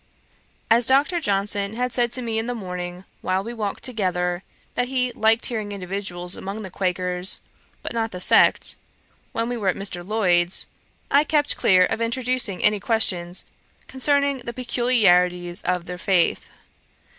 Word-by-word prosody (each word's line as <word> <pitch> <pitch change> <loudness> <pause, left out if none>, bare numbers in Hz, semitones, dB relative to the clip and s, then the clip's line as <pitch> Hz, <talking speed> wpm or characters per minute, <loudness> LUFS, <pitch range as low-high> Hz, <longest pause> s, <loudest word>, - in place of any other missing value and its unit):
As 230 +1 +5
Dr. 285 +7 +3
Johnson 200 -4 0
had 250 +1 -1
said 240 -2 +3
to 255 - 0
me 225 -1 -1
in 225 - -3
the 245 - -2
morning, 180 -3 -6 0.2
while 185 +1 0
we 235 +3 -6
walked 210 -4 -4
together, 180 -6 -1 0.3
that 245 - 0
he 250 -1 0
liked 225 +2 +2
individuals 195 -4 -3
among 200 +3 -6
the 190 - -7
Quakers, 180 0 0 0.4
but - - -5
not 225 -1 -1
the 180 - -7
sect; - - +3 0.5
when 230 0 -2
we 245 0 -3
were 205 -4 -3
at 185 - +2
Mr. 195 -3 -4
Lloyd's, 180 -3 +2 0.5
I 285 +1 +5
kept 295 -1 +1
clear 185 -1 +4
of 220 - -3
introducing 240 -4 0
any 210 0 +3
questions 185 -5 0 0.4
concerning 280 +1 +1
the 235 -1 -6
peculiarities 195 -8 +2
of 180 -1 -1
their 180 0 -7
faith. 185 -3 +1
205 Hz, 155 wpm, -23 LUFS, 180-240 Hz, 0.5 s, As